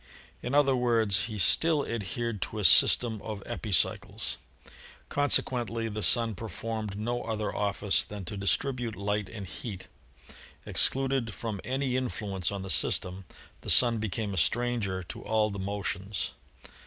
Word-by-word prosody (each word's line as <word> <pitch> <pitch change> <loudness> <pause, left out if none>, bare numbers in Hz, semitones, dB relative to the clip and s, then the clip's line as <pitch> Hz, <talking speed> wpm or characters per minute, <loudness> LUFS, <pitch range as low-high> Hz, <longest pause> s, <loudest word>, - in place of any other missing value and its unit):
In 125 +3 -3
other 140 -2 +4
words, 115 -5 +1
he 110 -2 -6
still 155 - +3
adhered 115 -1 -4
to 110 - -4
a 105 - -3
system 110 +6 +6
of 105 -3 -7
epicycles. 105 -2 0 0.7
Consequently 120 -5 +1
the 105 0 -5
Sun 115 +1 +5
performed 110 +1 -5
no 120 +3 -2
other 110 -2 -4
office 100 -1 +2
than 105 -2 -8
to 100 - -6
distribute 115 +5 -1
light 105 0 -2
and 105 -3 -8
heat. 95 +1 -8 0.8
Excluded 135 -5 0
from 110 -5 -5
any 130 0 -1
influence 100 -8 -3
on 100 -1 -5
the 95 - -4
system, 90 +6 0 0.4
the - - -6
Sun 120 -2 +7
became 105 -1 -3
a - - -5
stranger 110 -2 -1
to - - -9
all 110 0 0
the 100 - -6
motions. 100 0 -3
110 Hz, 140 wpm, -28 LUFS, 100-120 Hz, 0.8 s, Sun